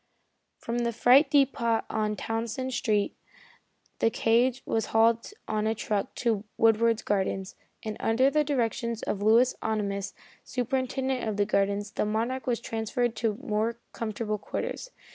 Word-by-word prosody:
From 235 +1 -3
the 235 0 0
freight 255 +5 +5
depot 255 -5 +2
on 215 -1 -1
Townsend 230 +4 -3
Street 210 -4 0 0.8
the 225 - +4
cage 240 +3 +2
was 225 - -1
hauled 230 - +2 0.2
on 215 0 0
a 220 - +1
truck 210 -1 -2
to 225 -4 0
Woodward's 225 0 +3
Gardens, 195 -1 -1 0.3
and 215 -1 -4
under 255 +5 +3
the 300 +1 +3
directions 235 -4 -1
of 200 - -2
Louis 230 +4 +5
Ohnimus, 200 -3 -2 0.3
superintendent 260 0 -1
of 210 - -3
the 205 - +3
gardens, 200 0 0
the - - -1
Monarch 235 +5 -2
was 240 -2 +1
transferred 230 +1 -2
to 220 -2 0
more 225 -1 -1 0.2
comfortable 215 -1 -3
quarters. - - -4
225 Hz, 145 wpm, -28 LUFS, 215-245 Hz, 0.8 s, freight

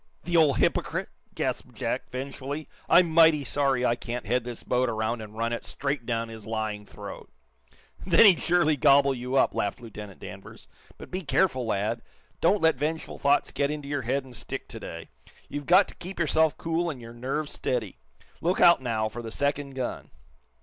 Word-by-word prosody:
"The 175 0 -2
old 155 -5 +5
hypocrite!" - - 0 0.3
gasped - - -3
Jack, - - -3
vengefully 140 +3 -5 0.2
"I'm 175 -2 +6
mighty 160 -2 +6
sorry 135 -2 +1
I 120 - +3
can't 120 +1 -5
head 125 -1 +1
this 120 -2 -7
boat 125 0 +1
around 110 +1 -2
and 110 0 -10
run 115 +1 -1
it 120 - -4
straight 140 -4 -3
down 115 -1 -1
his 110 -2 -10
lying 110 -2 -3
throat!" - - -9 0.7
"Then 180 +4 +6
he'd 190 -5 +7
surely 170 -3 +3
gobble 140 -1 +5
you 125 +1 -4
up!" 135 - +4
laughed 100 - -2
Lieutenant 105 -4 -10
Danvers. - - -10 0.3
"But - - -11
be 185 - -2
careful, 140 -6 +1
lad! 110 +3 -1 0.4
Don't 190 +2 +3
let 160 -4 +4
vengeful 155 +2 -3
thoughts 140 +1 +2
get 140 0 0
into 150 -1 -5
your 145 -1 -1
head 130 +3 -1
and 125 -2 -12
stick - - -5
to - - -7
day. - - -8 0.4
You've 145 -1 -6
got 185 +3 +6
to - - -10
keep 185 +2 -8
yourself 160 -1 +2
cool 165 +1 -1
and 145 -6 -5
your 115 0 -10
nerve 135 +6 -3
steady. 120 -8 -3 0.4
Look 175 +3 +1
out, 170 -5 +7
now, 110 -3 -1
for 115 +2 -7
the 115 - -6
second 140 +2 -1
gun!" 130 -2 -4
135 Hz, 190 wpm, -27 LUFS, 115-155 Hz, 0.7 s, he'd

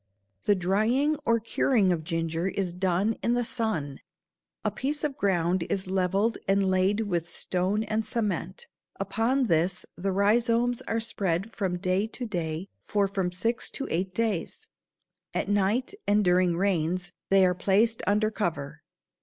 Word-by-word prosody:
The 205 - +4
drying 220 +11 +2
or 230 0 +4
curing 220 -2 +2
of 165 -3 -1
ginger 165 +1 -1
is 190 -2 -2
done 190 +4 0
in 235 - +1
the 245 -1 0
sun. 165 - -2 0.7
A 215 - +2
piece 280 +8 -2
of 295 -3 -1
ground 180 -3 +1
is 190 - -1
leveled 190 +4 +1
and 195 0 +3
laid 190 +3 +2
with 175 -5 -1
stone 190 +4 0
and 220 0 -1
cement. 225 - -3 0.3
Upon 255 +5 +1
this 175 -1 +1
the 195 +3 -2
rhizomes 230 +4 +2
are 225 - 0
spread 195 -2 -1
from 190 -5 -2
day 185 +3 0
to 245 +2 -5
day 170 -4 -3
for 205 -2 +1
from 190 -2 -2
six 225 +7 -1
to 275 - -4
eight 185 +3 -1
days. 220 -7 -2 0.7
At - - -1
night 205 - +1
and 205 0 +3
during 180 -1 +3
rains 180 -1 0 0.2
they 195 -1 +6
are 180 - +3
placed 210 +5 +2
under 210 +1 +2
cover. 155 -8 -3
195 Hz, 155 wpm, -27 LUFS, 180-225 Hz, 0.7 s, they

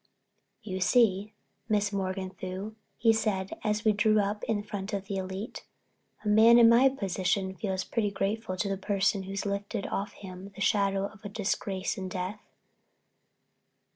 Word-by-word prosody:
"You 190 -3 -4
see, 205 0 +3 0.4
Miss 205 -1 +2
Morganthau," 190 +1 -4 0.2
he 225 0 +4
said 200 -4 -1
as 210 0 0
we 215 - +6
drew 215 +1 +3
up 205 +1 -1
in 205 -2 -1
front 205 -1 -5
of 200 -1 -2
the 195 0 -3
Elite, 190 +4 -5 0.6
"a - - -2
man 220 +3 +7
in 235 -1 +8
my 240 +4 +7
position 190 -5 -1
feels 190 -1 -2
pretty 215 0 0
grateful 200 0 -2
to 200 - 0
the 195 0 -1
person 195 0 +1
who's 195 +1 -3
lifted 200 +1 -3
off 200 +2 -3
him 190 0 -9
the - - -11
shadow 195 -1 +2
of 205 0 -9
disgrace 195 -2 -2
and 190 -1 -4
death." 185 +3 -4
200 Hz, 155 wpm, -29 LUFS, 190-215 Hz, 0.6 s, in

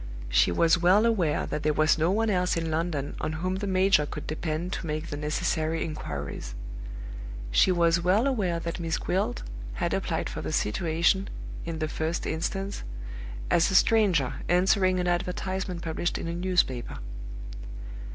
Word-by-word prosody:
She - - +4
was 165 - +4
well 190 +5 +5
aware 185 -10 +2
that 150 - -3
there 155 0 +2
was 155 +1 +4
no 160 +2 +3
one 220 +3 +2
else 180 -2 +1
in 165 -1 -1
London 155 -3 -1
on 155 - -1
whom 185 +4 -1
the 205 +1 -3
major 185 -5 +4
could 150 - -6
depend 155 +2 -2
to 170 - -4
make 155 +1 -3
the 145 - -3
necessary 155 +2 0
inquiries; 70 - -5 1.0
she - - +5
was 170 -1 +3
well 190 +7 +3
aware 200 -11 +1
that 170 +1 -4
Miss 165 -1 -1
Gwilt 180 - -1 0.3
had - - -1
applied - - -1
for - - -5
the - - -3
situation, 170 - +1 0.4
in 165 -1 -3
the 155 -1 -1
first 160 +2 -2
instance, 195 +5 -2 0.7
as 170 - +4
a 190 - 0
stranger 185 - +4
answering 185 +1 +4
an 180 - 0
advertisement 180 0 -2
published 165 +1 -1
in - - -4
a 165 - -2
newspaper. 170 - 0
170 Hz, 160 wpm, -28 LUFS, 155-185 Hz, 1.0 s, well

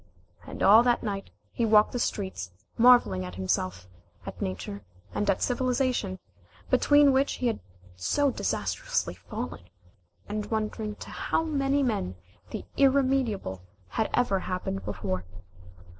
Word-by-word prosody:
And - - -5
all 215 +3 +8
night, 215 -5 0 0.2
he 235 - -2
walked 215 -1 +5
the 245 - -2
streets 190 - -2 0.3
marvelling 230 - +5
at 90 0 -7
himself, 95 -1 -2 0.4
at - - -8
Nature, 100 +2 -4 0.3
and 205 -1 -1
at 195 - +2
Civilization, 250 -5 0 0.5
between 290 -1 +5
which 270 +2 +2
he 255 - -4
had 235 - +1 0.4
so 275 - +1
disastrously - - -1
fallen, - - -6 0.7
and 210 0 -3
wondering 215 -1 -2
to - - -10
how - - 0
many 280 -3 +1
men 95 - -1 0.3
the - - -6
irremediable 260 - +2 0.3
had 220 - -1
ever 220 -6 +2
happened 180 - -3
before. 95 -2 -3
215 Hz, 130 wpm, -28 LUFS, -, 0.7 s, all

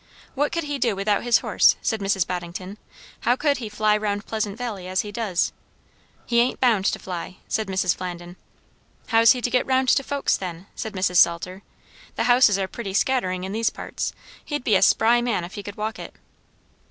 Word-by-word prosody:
"What 290 +3 -1
would 335 - -1
he 290 -1 -4
do 230 -5 +1
without 200 +1 0
his 240 -1 +4
horse?" - - +4
said 220 - -1
Mrs. 195 -2 +1
Boddington. 180 +3 -6 0.4
"How 245 - +2
could 285 +1 +1
he 230 -4 -6
fly 210 0 +2
round 210 -1 -2
Pleasant 215 -2 -3
Valley 215 -7 -5
as 185 0 0
he 210 - -8
does?" 205 -5 -1 0.7
"He 235 -1 +2
ain't 245 +2 +1
bound 225 -7 +3
to - - +1
fly," 180 0 -7
said 220 -2 -1
Mrs. 185 -2 +1
Flandin. 175 -1 -7 0.7
"How's 230 0 +6
he 250 -2 -6
to - - +1
get 250 - +1
round 260 -1 +2
to - - +4
folks, 280 +1 0
then?" 180 -1 -7
said 220 -2 -6
Mrs. 185 -2 0
Salter. 180 +3 +3 0.5
"The - - 0
houses 245 -4 +5
are 195 -1 -1
pretty 195 -2 -6
scattering 185 -7 0
in 190 - -4
these 225 +2 +1
parts; - - -5 0.3
he'd 295 -3 -4
be 220 - +1
a 190 - +3
spry 230 +4 +4
man 235 -7 -1
if 175 - -8
he 205 - -6
could 205 0 -9
walk 215 +1 -4
it." - - -9
210 Hz, 200 wpm, -23 LUFS, 185-240 Hz, 0.7 s, How's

